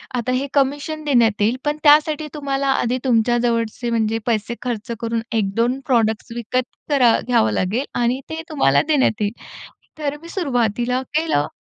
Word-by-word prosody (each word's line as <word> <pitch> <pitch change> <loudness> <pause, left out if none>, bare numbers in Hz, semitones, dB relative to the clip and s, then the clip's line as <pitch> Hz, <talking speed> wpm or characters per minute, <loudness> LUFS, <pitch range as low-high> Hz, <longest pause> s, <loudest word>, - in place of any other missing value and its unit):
आता 245 +1 -1
हे 270 +2 -1
कमिशन 290 +3 0
देण्यात 230 -6 +3
येईल. 230 +5 +2
पण 295 +1 0
त्यासाठी 300 +1 +4
तुम्हाला, 275 -1 -2
आधी 255 -2 +1
तुमच्या 240 -1 +3
जवळचे 235 0 -1
म्हणजे 225 0 0
पैसे 230 +1 -1
खर्च 235 -1 -4
करून 230 0 -1
1-2 230 +5 0
प्रॉडक्ट्स 225 -2 +1
विकत 240 +2 -2 0.2
तर 275 -3 +3 0.2
घ्यावं 110 - +2
लागेल 220 - -1 0.2
आणि 250 +3 +1
ते 320 0 -4
तुम्हाला 145 - +3
देण्यात 265 -7 +2
येईल. 205 +1 0 0.7
तर 295 -1 -2
मी 335 - -10
सुरुवातीला 250 - 0 0.2
केलं. 315 - +1
245 Hz, 155 wpm, -20 LUFS, 225-280 Hz, 0.7 s, त्यासाठी